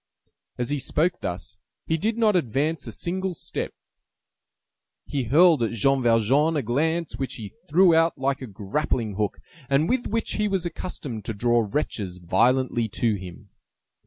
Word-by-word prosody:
As 120 +2 -2
he 145 - 0
spoke 155 +3 0
thus, 95 -1 -5 0.3
he 160 - +1
did 220 +8 -1
not 220 -3 +3
advance 150 0 0
a - - -4
single 185 - -3
step; - - -4 1.3
he 140 -4 -2
hurled 160 +4 +5
at 115 0 0
Jean 135 +4 +2
Valjean 125 +7 +3
a 140 - 0
glance 160 +8 0
which 135 - -3
he 105 -4 -8 0.2
threw 175 +3 +6
out 165 +1 +3
like 135 0 -1
a 130 - -5
grappling 110 +2 -2
hook, 105 +1 -1 0.3
and 140 +3 +3
with 255 +3 0
which 225 +1 -1
he 210 0 +1
was 190 -3 -1
accustomed 150 - -5
to 115 - -4
draw 120 +1 +2
wretches 100 -8 -2
violently 120 +6 +2
to 115 +2 0
him. 90 -3 -8
135 Hz, 160 wpm, -25 LUFS, 115-165 Hz, 1.3 s, threw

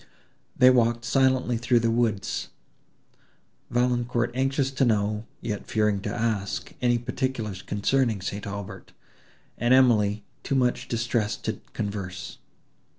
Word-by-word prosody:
They 130 0 +7
walked 120 -1 +2
silently 130 -2 +2
through 120 0 +3
the 115 0 +2
woods, 115 -4 0 1.2
Valancourt 120 -1 +1
anxious 135 +1 0
to 135 0 0
know, 105 -1 +1
yet 105 -3 -4
fearing 105 -2 +1
to - - -3
ask 110 -4 -2
any 120 -1 +3
particulars 120 -5 -3
concerning 110 +1 +1
St. 100 +2 -5
Aubert; 100 -1 -7 0.7
and 120 +2 +4
Emily 110 -5 +4 0.2
too 140 - -2
much 125 -2 +1
distressed 115 -2 -1
to - - -3
converse. 95 -3 -5
115 Hz, 120 wpm, -26 LUFS, 105-125 Hz, 1.2 s, They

